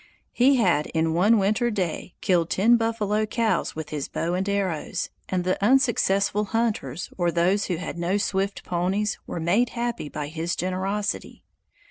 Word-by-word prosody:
He 265 +3 +4
had 180 - +2
in 160 0 +2
one 205 +7 +4
winter 215 +4 +2
day 185 -5 -3
killed 175 -3 +2
ten 225 +5 +4
buffalo 215 -2 0
cows 225 0 0
with 160 -1 -6
his 145 -2 -3
bow 170 +1 -2
and 190 +2 -1
arrows, 195 -6 -2 0.2
and 185 -1 0
the 185 +2 -1
unsuccessful 210 -4 +3
hunters 210 - -2
or 175 -1 +2
those 180 +4 +2
who 180 - -1
had 175 0 -6
no 175 +4 +1
swift 195 -1 -1
ponies 190 +4 -1
were - - -4
made 200 +9 +2
happy 235 -10 -2
by 145 -1 -5
his 165 +2 -3
generosity. 190 +3 -3
195 Hz, 160 wpm, -25 LUFS, 175-215 Hz, 0.2 s, He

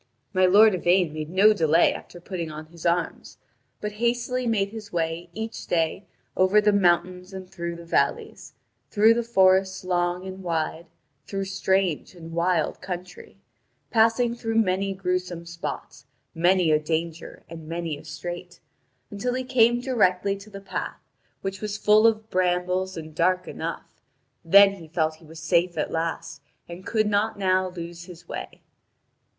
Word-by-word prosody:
My 185 0 +4
lord 210 +3 +7
Yvain 175 -2 +2
made 155 0 -5
no 200 +5 +5
delay 165 -3 +3
after 175 - -10
putting 175 -2 -5
on 155 +1 -8
his 170 +1 -5
arms, 170 0 -2 0.4
but 210 - -4
hastily 245 +1 0
made 200 -3 +1
his 215 -1 -9
way 165 0 -2
each 220 +1 -6
day 165 +3 0 0.3
over 190 +3 +4
the 210 0 +3
mountains 180 0 +1
and 190 -1 -7
through 170 -2 -5
the 170 0 -11
valleys, 170 - -1 0.4
through 220 +2 +5
the 235 - 0
forests 190 -4 +3
long 180 0 -1
and 190 0 -7
wide, 165 -1 -2 0.4
through 195 -1 -3
strange 190 -3 0
and 165 -1 -10
wild 170 -1 0
country, 180 -1 -8 0.5
passing 230 +1 +3
through 225 -1 -4
many 195 -2 +1
gruesome 180 -2 -3
spots, 170 0 -7 0.3
many 175 0 +3
a 150 - +4
danger 160 +1 -4
and 160 -1 -10
many 165 -1 -3
a 145 - -13
strait, 175 +3 -7 0.5
until 245 +5 -2
he 255 - -2
came 240 -2 +3
directly 200 -7 +1
to 200 +2 -12
the 200 -1 -9
path, 195 - -5 0.4
which 195 0 -5
was 210 -1 -3
full 215 +1 +5
of 220 -1 0
brambles 180 0 0
and 155 -1 -8
dark 180 +3 +1
enough; 165 0 -6 0.4
then 195 +4 +7
he 165 -3 -12
felt 160 -1 -1
he 160 - -18
was 160 +1 -11
safe 170 +2 +1
at - - -1
last, 165 -2 -3 0.3
and 175 +2 -10
could 215 -2 +1
not 210 +1 0
now 185 -1 +1
lose 170 -1 -8
his 175 -1 -13
way. - - -7
185 Hz, 160 wpm, -25 LUFS, 170-200 Hz, 0.5 s, lord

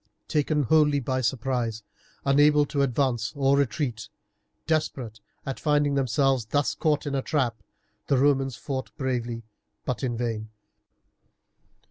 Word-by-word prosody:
Taken 150 -1 +1
wholly 150 +2 +4
by 130 0 -1
surprise, 115 -2 -1 0.4
unable 145 +1 +5
to 140 0 -1
advance 125 -4 0
or 140 -1 +3
retreat, 135 -4 -1 0.6
desperate 130 -8 -1 0.3
at 135 - -4
finding 145 -2 +2
themselves 135 -2 +1
thus 145 +4 +1
caught 155 -3 0
in 145 - -3
a 135 - +1
trap, 125 -7 -1 0.5
the 140 - +3
Romans 135 -1 +2
fought 130 -2 -4
bravely 120 -4 -2 0.4
but 125 - -2
in 120 -3 -1
vain. 110 -2 -3
135 Hz, 125 wpm, -26 LUFS, 120-145 Hz, 0.6 s, unable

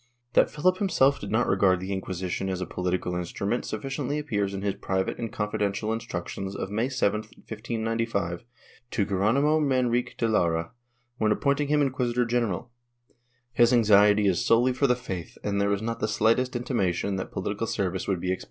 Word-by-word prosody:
That - - +5
Philip 185 +5 +1
himself 140 -9 +3
did 100 - -6
not 110 +2 +2
regard 95 -1 +3
the 95 +2 -4
Inquisition 95 0 -3
as 95 -1 -2
a 90 - -2
political 90 +1 -2
instrument 95 +6 -2
sufficiently 135 +5 -3
appears 105 -10 -1
in 95 0 -5
his 100 -1 0
private 95 -1 -2
and 115 - -4
confidential 105 +1 -1
instructions 95 -3 -5
of 95 - -4
May 115 +5 0
7, 105 -6 +1
1595, 110 -5 -3 0.5
to 100 - 0
Geronimo 115 +11 +2
Manrique 125 -4 +1
de 115 - +1
Lara, 85 -6 +1 0.5
wdien 110 -1 +3
appointing 140 +5 +1
him 150 0 +3
inquisitor 125 -2 0
general; 120 -2 -1 0.8
his 120 0 +5
anxiety 105 -3 +5
is 95 -4 +2
solely 120 +3 +4
for 140 +2 +2
the 125 - +3
faith 95 -9 -7
and 100 -1 0
there 100 0 +2
is 100 +1 -1
not 115 +1 -3
the 110 - 0
slightest 115 +4 +2
intimation 100 -6 -1
that 95 - -5
political 100 +4 -3
service 95 -3 -2
would 95 -3 0
be 90 +1 -1
expected. 95 - -1
105 Hz, 175 wpm, -26 LUFS, 95-125 Hz, 0.8 s, That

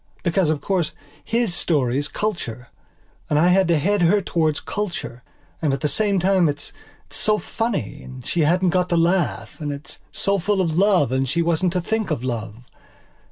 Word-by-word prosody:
Because, 170 -1 +2
of 155 -2 0
course, 175 -5 0 0.3
his 230 -4 0
story 140 -7 +1
is 145 - -2
culture 125 - -4 0.6
and 150 - +2
I 170 +4 +5
had 185 0 +4
to 170 -2 +3
head 200 +6 +1
her 175 +5 +4
towards 160 -5 0
culture 170 - -4 0.4
and 145 -4 +2
at 135 - -8
the 150 - +1
same 200 +7 +1
time 185 -2 +3
it's 145 -1 -5 0.4
so 215 0 +1
funny 225 - -3
and 130 -1 -10
she 175 - 0
hadn't 175 +4 +3
got 180 0 +1
to 170 - +2
laugh, 175 +2 0
and 145 -1 -2
it's 140 +1 -9
so 200 0 0
full 200 +3 0
of 165 -4 0
love 185 - +3
and 130 0 0
she 170 +4 +1
wasn't 170 +2 +1
to 180 - 0
think 220 +4 -1
of 150 -6 -2
love. 115 -2 -4
170 Hz, 190 wpm, -22 LUFS, 145-190 Hz, 0.6 s, I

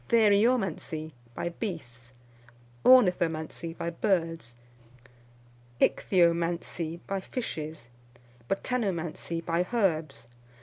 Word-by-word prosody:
Theriomancy, 205 -8 +2 0.2
by 170 - -2
beasts. 140 - -7 0.7
Ornithomancy, 170 -8 +3
by 170 - -3
birds. 165 - -1 1.2
Ichthyomancy, 170 -1 +1
by 195 0 -2
fishes. 155 - -5 0.6
Botanomancy, 175 -7 -2
by 170 +2 0
herbs. 160 - 0
170 Hz, 70 wpm, -28 LUFS, 160-195 Hz, 1.2 s, Ornithomancy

